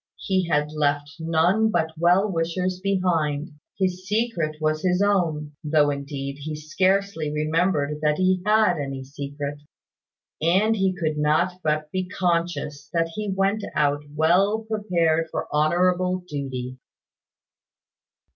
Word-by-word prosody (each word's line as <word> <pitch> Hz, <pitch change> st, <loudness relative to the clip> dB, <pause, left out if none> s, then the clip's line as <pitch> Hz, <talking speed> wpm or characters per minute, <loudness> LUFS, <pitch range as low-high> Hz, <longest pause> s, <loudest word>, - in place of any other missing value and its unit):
He 185 Hz, -2 st, 0 dB
had 150 Hz, -2 st, +1 dB
left 145 Hz, -1 st, -1 dB
none 170 Hz, +7 st, +2 dB
but 160 Hz, -5 st, 0 dB
well 175 Hz, +5 st, +3 dB
wishers 180 Hz, +1 st, -1 dB
behind. 175 Hz, -6 st, 0 dB, 0.3 s
His 185 Hz, -1 st, -1 dB
secret 205 Hz, -8 st, 0 dB
was 155 Hz, 0 st, 0 dB
his 180 Hz, 0 st, +1 dB
own; 170 Hz, -7 st, +1 dB
(though, 150 Hz, -1 st, +3 dB
indeed, 140 Hz, 0 st, -5 dB
he 155 Hz, +2 st, -5 dB
scarcely 185 Hz, +1 st, 0 dB
remembered 150 Hz, -1 st, 0 dB
that 150 Hz, -1 st, +2 dB
he 185 Hz, 0 st, +2 dB
had 210 Hz, -3 st, +3 dB
any 135 Hz, -2 st, -4 dB
secret;) 140 Hz, +1 st, -6 dB, 0.8 s
and 190 Hz, +7 st, +3 dB
he 190 Hz, -3 st, +1 dB
could 155 Hz, -3 st, -2 dB
not 170 Hz, +5 st, +1 dB
but 155 Hz, 0 st, -1 dB
be 185 Hz, -1 st, -2 dB
conscious 170 Hz, -5 st, -1 dB
that 165 Hz, -1 st, +1 dB
he 210 Hz, +5 st, -4 dB
went 195 Hz, +2 st, 0 dB
out 145 Hz, -1 st, +2 dB
well 190 Hz, +8 st, +3 dB
prepared 170 Hz, -7 st, +1 dB
for -, -, -4 dB
honourable 180 Hz, +4 st, +2 dB
duty. 130 Hz, -4 st, -5 dB
165 Hz, 130 wpm, -24 LUFS, 150-185 Hz, 0.8 s, well